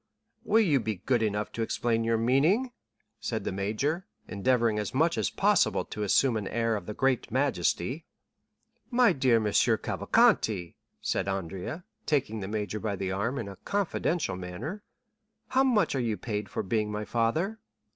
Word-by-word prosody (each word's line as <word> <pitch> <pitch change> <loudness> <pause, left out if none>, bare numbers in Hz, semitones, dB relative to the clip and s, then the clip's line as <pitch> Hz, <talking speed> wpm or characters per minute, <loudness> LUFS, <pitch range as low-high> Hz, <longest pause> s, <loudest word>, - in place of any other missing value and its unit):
"Will 220 +2 +4
you 150 -9 +3
be 110 -2 -2
good 115 +6 0
enough 105 -1 -1
to 115 - -4
explain 115 0 0
your 115 0 +2
meaning?" 150 - +2 0.5
said - - -3
the - - -2
major, 110 - -1 0.2
endeavoring 115 +1 +1
as 105 +3 -4
much 160 +3 +3
as 110 -4 0
possible - - +2
to 105 - -7
assume 115 +4 +3
an 105 -3 -3
air 115 -1 0
of 100 -4 -6
the 105 - -5
greatest 135 -2 +1
majesty. 130 - 0 0.8
"My 245 -5 +4
dear 130 -4 +3
M. 115 - +2
Cavalcanti," 90 -6 +2 0.3
said 95 - -1
Andrea, 95 - -4 0.2
taking 135 -7 0
the 95 - -5
major 105 0 -3
by 105 -2 -2
the 95 0 -3
arm 115 +8 -1
in 115 - -4
a 100 - -9
confidential 175 - -1
manner, 90 - -6 0.7
"how 265 +1 +3
much 220 -10 +2
are 135 - 0
you 115 -4 -1
paid 105 0 -4
for - - -3
being 105 +2 0
my 105 0 -3
father?" 155 - 0
115 Hz, 165 wpm, -28 LUFS, 105-145 Hz, 0.8 s, Will